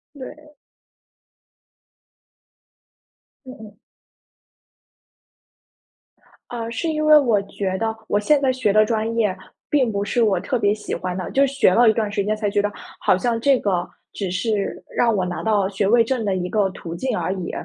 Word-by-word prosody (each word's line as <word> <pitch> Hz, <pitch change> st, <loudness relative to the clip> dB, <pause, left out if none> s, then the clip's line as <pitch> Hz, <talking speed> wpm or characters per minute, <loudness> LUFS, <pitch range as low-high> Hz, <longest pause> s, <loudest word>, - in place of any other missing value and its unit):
对。 300 Hz, +3 st, -11 dB, 2.9 s
嗯 255 Hz, -, -9 dB
嗯。 210 Hz, -2 st, -12 dB, 2.7 s
啊， 230 Hz, -1 st, -5 dB
是 235 Hz, +8 st, -3 dB
因 310 Hz, -1 st, -1 dB
为 305 Hz, 0 st, +8 dB
我 230 Hz, -8 st, +2 dB
觉 190 Hz, -1 st, -4 dB
得 225 Hz, 0 st, -1 dB
我 205 Hz, -, +2 dB
现 290 Hz, +6 st, +3 dB
在 265 Hz, -2 st, +2 dB
学 250 Hz, -6 st, 0 dB
的 215 Hz, +1 st, +5 dB
专 225 Hz, +1 st, -1 dB
业 205 Hz, -5 st, +1 dB, 0.3 s
并 260 Hz, -6 st, +2 dB
不 200 Hz, -1 st, -2 dB
是 235 Hz, +3 st, 0 dB
我 200 Hz, -5 st, +2 dB
特 250 Hz, -, -2 dB
别 205 Hz, -1 st, +2 dB
喜 210 Hz, -, -5 dB
欢 180 Hz, 0 st, -4 dB
的。 185 Hz, -, -5 dB
就 275 Hz, +1 st, +3 dB
学 270 Hz, -8 st, +2 dB
了 235 Hz, +3 st, +5 dB
一 -, -, +6 dB
段 215 Hz, -2 st, -2 dB
时 200 Hz, -2 st, -1 dB
间 215 Hz, +1 st, -1 dB
才 210 Hz, -2 st, -2 dB
觉 205 Hz, 0 st, +1 dB
得， 205 Hz, 0 st, -1 dB, 0.3 s
好 -, -, +3 dB
像 230 Hz, +3 st, -1 dB
这 275 Hz, 0 st, +3 dB
个 180 Hz, -3 st, -1 dB, 0.2 s
只 195 Hz, -3 st, -4 dB
是 200 Hz, +1 st, -2 dB
让 230 Hz, -2 st, +3 dB
我 185 Hz, -2 st, 0 dB
拿 180 Hz, -1 st, -4 dB
到 205 Hz, -3 st, +1 dB
学 195 Hz, 0 st, -1 dB
位 230 Hz, +1 st, +5 dB
证 240 Hz, -2 st, -2 dB
的 195 Hz, -2 st, 0 dB
一 180 Hz, 0 st, -3 dB
个 205 Hz, -3 st, +1 dB
途 170 Hz, -2 st, -8 dB
径 255 Hz, +3 st, -2 dB
而 185 Hz, -, -2 dB
已。 180 Hz, -2 st, -5 dB
215 Hz, 190 characters per minute, -21 LUFS, 195-245 Hz, 2.9 s, 为